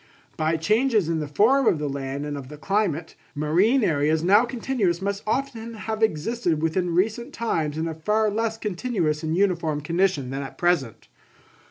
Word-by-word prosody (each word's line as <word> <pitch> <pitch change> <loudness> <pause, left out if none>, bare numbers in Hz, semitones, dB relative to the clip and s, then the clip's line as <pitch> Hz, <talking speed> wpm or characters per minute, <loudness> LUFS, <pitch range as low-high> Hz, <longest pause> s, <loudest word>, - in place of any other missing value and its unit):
By 160 +1 0
changes 215 - +2
in 165 -1 0
the 150 - -3
form 230 - +3
of - - +4
the 150 0 -3
land 140 0 -4
and 145 0 -4
of 140 -2 -7
climate, 180 -4 -1 0.2
marine 180 - +2
areas 155 -2 +1
now 205 +6 +5
continuous 235 -7 -1
must 200 +1 -2
often 235 -2 -2
have 220 +1 -4
existed 180 -2 0
within 165 +2 0
recent 225 +8 0
times 160 -10 -1
in 160 +1 -1
a 165 - -3
far 210 +7 +1
less 225 +1 -1
continuous 185 -7 -1
and 160 +1 -1
uniform 170 -6 +1
condition 165 -4 0
than 135 +1 -3
at 135 - -8
present. 170 -10 0
175 Hz, 170 wpm, -24 LUFS, 155-220 Hz, 0.2 s, now